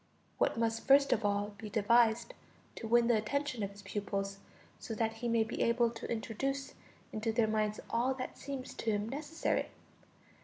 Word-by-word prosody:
What - - +2
must 225 0 0
first 275 0 +6
of 220 - -1
all 205 0 0
be 215 - -6
devised, 230 +2 +3 0.4
to 225 - -5
win 235 +1 +5
the 235 0 +4
attention 270 +3 -1
of 200 - -1
his 200 0 -13
pupils, 195 0 -3 0.4
so 225 - -5
that 225 0 -1
he 240 - -1
may 230 -1 +3
be 220 - -4
able 235 0 +3
to 230 0 -7
introduce 270 +5 -2 0.4
into 220 +1 -1
their 225 0 +3
minds 215 -1 0
all 250 +3 +1
that 255 -1 -5
seems 275 -2 -6
to 230 - -3
him 205 0 0
necessary? 295 +5 -1
225 Hz, 180 wpm, -33 LUFS, 215-245 Hz, 0.4 s, first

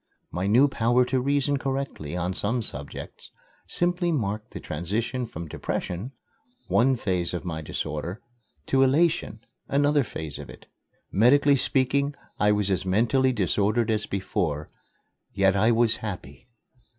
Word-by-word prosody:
My 90 +4 -2
new 125 +8 +5
power 125 -1 +2
to 130 +1 0
reason 140 +1 +1
correctly 135 - -3
on 90 +1 -1
some 115 +5 -1
subjects 70 -6 -7 0.4
simply 175 0 +2
marked 110 -7 -2
the - - -8
transition 115 - -3
from 85 -5 -7
depression, 90 - -4 0.6
one 130 +3 +3
phase 90 -6 -1
of 90 - -5
my 80 -3 -3
disorder, 80 +5 -4 0.5
to 135 - +2
elation, 150 -3 +2 0.3
another 145 +1 +3
phase 80 - -6
of - - -9
it. - - -13 0.5
Medically 140 +7 +5
speaking, 140 +2 +2 0.2
I 105 0 +4
was 105 -1 +1
as 95 - +1
mentally 120 +8 +2
disordered 105 +2 +1
as 110 -1 -1
before 90 -6 -2 0.6
yet 95 -1 +3
I 105 +4 +3
was 115 -1 +3
happy! 90 - -7
110 Hz, 140 wpm, -26 LUFS, 95-135 Hz, 0.6 s, new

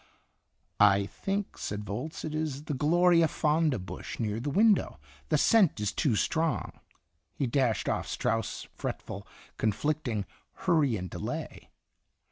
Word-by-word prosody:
"I 100 -1 +5
think," 195 - -4
said 105 0 -4
Volz, 115 +10 -5
"it 155 - -4
is 155 -2 -2
the 150 - -3
gloria 170 +4 +4
fonda 155 -2 +1
bush 95 -1 -7
near 110 -1 -1
the 140 +5 -3
window; 210 +6 +3 0.3
the - - +3
scent 195 - +4
is 105 -1 0
too 130 -7 +1
strong." 160 +8 0 0.6
He 140 - 0
dashed 125 -3 +1
off - - -1
Strauss' 115 -2 -2
fretful, - - -5 0.3
con 110 - +2
flicting 120 -5 -1 0.3
"Hurry 145 -9 +2
and 90 -1 -5
Delay." - - -6
145 Hz, 135 wpm, -29 LUFS, 110-160 Hz, 0.6 s, I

